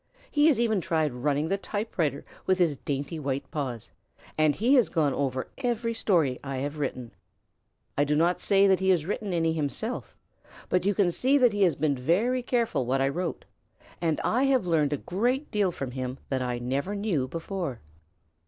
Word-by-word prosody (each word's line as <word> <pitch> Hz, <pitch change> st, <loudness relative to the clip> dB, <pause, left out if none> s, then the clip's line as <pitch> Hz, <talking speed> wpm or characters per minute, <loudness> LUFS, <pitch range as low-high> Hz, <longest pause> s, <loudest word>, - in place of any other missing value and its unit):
He 295 Hz, +1 st, +4 dB
has 295 Hz, -7 st, +4 dB
even 220 Hz, -5 st, +2 dB
tried 160 Hz, -5 st, 0 dB
running 145 Hz, +5 st, 0 dB
the 195 Hz, -, 0 dB
typewriter 185 Hz, -7 st, -2 dB, 0.2 s
with 185 Hz, -, +3 dB
his 170 Hz, -5 st, +2 dB
dainty 140 Hz, +4 st, -4 dB
white 140 Hz, -1 st, -3 dB
paws, 130 Hz, -7 st, -4 dB, 0.4 s
and 155 Hz, -2 st, +3 dB
he 240 Hz, +6 st, +2 dB
has 250 Hz, -7 st, +5 dB
gone 150 Hz, -5 st, +1 dB
over 130 Hz, -2 st, -2 dB
every 235 Hz, -2 st, -1 dB
story 170 Hz, -, +1 dB
I 135 Hz, -1 st, -4 dB
have 145 Hz, +3 st, -4 dB
written. 130 Hz, -4 st, -3 dB, 0.8 s
I 145 Hz, -, +3 dB
do 150 Hz, +1 st, +1 dB
not 170 Hz, +3 st, +2 dB
say 200 Hz, -1 st, +4 dB
that 190 Hz, -2 st, +4 dB
he 190 Hz, 0 st, +1 dB
has 175 Hz, -5 st, +3 dB
written 205 Hz, +1 st, -3 dB
any 165 Hz, -2 st, +1 dB
himself, 145 Hz, -5 st, -3 dB, 0.5 s
but 180 Hz, +1 st, +1 dB
you 205 Hz, -, +2 dB
can 185 Hz, -3 st, +3 dB
see 265 Hz, +10 st, +3 dB
that 245 Hz, -5 st, +4 dB
he 205 Hz, -, -1 dB
has 175 Hz, -6 st, +4 dB
been 150 Hz, -1 st, +1 dB
very 200 Hz, -, +1 dB
careful 235 Hz, -, 0 dB
what 135 Hz, +2 st, +1 dB
I 135 Hz, 0 st, +2 dB
wrote, 175 Hz, +4 st, -3 dB, 0.6 s
and 165 Hz, -3 st, +1 dB
I 250 Hz, +4 st, +2 dB
have 265 Hz, -7 st, +2 dB
learned 155 Hz, -4 st, +2 dB
a 145 Hz, -, 0 dB
great 245 Hz, -, -1 dB
deal 205 Hz, -3 st, +2 dB
from 135 Hz, -6 st, -5 dB
him 130 Hz, 0 st, -4 dB
that 130 Hz, -1 st, -1 dB
I 125 Hz, -1 st, -1 dB
never 135 Hz, +11 st, -2 dB
knew 195 Hz, -11 st, 0 dB
before. 165 Hz, -, -4 dB
165 Hz, 190 wpm, -27 LUFS, 140-205 Hz, 0.8 s, has